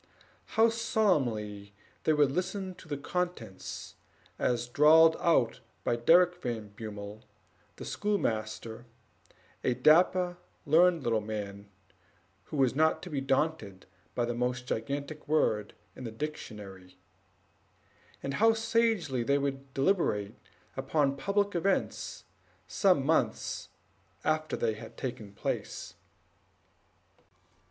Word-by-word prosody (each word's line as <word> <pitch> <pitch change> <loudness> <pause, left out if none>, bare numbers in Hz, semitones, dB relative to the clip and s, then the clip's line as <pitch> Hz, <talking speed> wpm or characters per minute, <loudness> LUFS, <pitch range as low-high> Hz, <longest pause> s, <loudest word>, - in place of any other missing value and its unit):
How 225 +1 +7
solemnly 120 - 0 0.3
they 155 - +4
would 145 -2 +3
listen 185 +3 -2
to 170 - -15
the 145 -2 -3
contents, 140 - -4 0.5
as 120 -1 +1
drawled 160 +5 +6
out 130 -9 +2 0.2
by - - +1
Derrick 175 +8 +4
Van 115 -5 -4
Bummel, 105 0 -8 0.5
the - - -8
schoolmaster, 115 - -2 0.8
a 125 - +2
dapper, 175 +6 +4 0.3
learned 170 +1 +4
little 115 -3 +1
man, 105 -1 -6 0.8
who 155 - -6
was 130 -3 +3
not 160 +3 +2
to 180 - -7
be 140 -2 -1
daunted 135 -8 -1 0.3
by 120 - +1
the 120 - -2
most 125 +1 -1
gigantic 140 +6 -4
word 110 -9 +1 0.2
in 130 - -9
the 115 - -5
dictionary; 105 -9 -7 1.3
and 140 - -2
how 225 +9 +5
sagely 225 - +1
they 140 +4 +2
would 135 -1 -3
deliberate 135 - +1 0.4
upon 140 -3 +1
public 200 +7 0
events 190 +3 -1 0.4
some 180 -9 +3
months 160 +2 0 0.5
after 155 0 0
they 110 -1 +1
had 110 - -11
taken 115 -6 -5
place. 100 - -4
140 Hz, 115 wpm, -30 LUFS, 110-170 Hz, 1.3 s, How